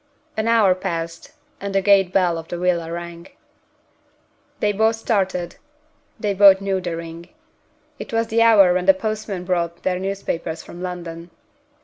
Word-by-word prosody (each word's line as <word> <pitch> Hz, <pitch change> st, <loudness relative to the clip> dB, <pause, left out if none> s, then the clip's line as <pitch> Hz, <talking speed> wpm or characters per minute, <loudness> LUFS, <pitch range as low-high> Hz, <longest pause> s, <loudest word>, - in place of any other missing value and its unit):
An 220 Hz, +1 st, -1 dB
hour 225 Hz, -5 st, +4 dB
passed, 170 Hz, -3 st, -5 dB, 0.3 s
and 200 Hz, 0 st, -5 dB
the 195 Hz, -, +3 dB
gate 195 Hz, -2 st, +4 dB
bell 180 Hz, -3 st, +1 dB
of 165 Hz, -, -10 dB
the 175 Hz, -, -5 dB
villa 170 Hz, -2 st, 0 dB
rang. 170 Hz, 0 st, -7 dB, 1.3 s
They 210 Hz, -, +2 dB
both 220 Hz, +2 st, +2 dB
started 190 Hz, -6 st, -2 dB, 0.6 s
they 210 Hz, -1 st, -1 dB
both 195 Hz, -1 st, +7 dB
knew 195 Hz, -1 st, -1 dB
the 175 Hz, -2 st, -3 dB
ring. 165 Hz, +1 st, -9 dB, 0.7 s
It -, -, -8 dB
was 230 Hz, 0 st, +1 dB
the 225 Hz, +1 st, +1 dB
hour 205 Hz, -6 st, +6 dB
when 180 Hz, 0 st, -1 dB
the 290 Hz, -, +7 dB
postman 215 Hz, -7 st, -4 dB
brought 170 Hz, -2 st, -2 dB
their 180 Hz, -1 st, 0 dB
newspapers 180 Hz, -4 st, -4 dB
from 175 Hz, -, -11 dB
London. 175 Hz, -2 st, -6 dB
185 Hz, 155 wpm, -21 LUFS, 170-205 Hz, 1.3 s, both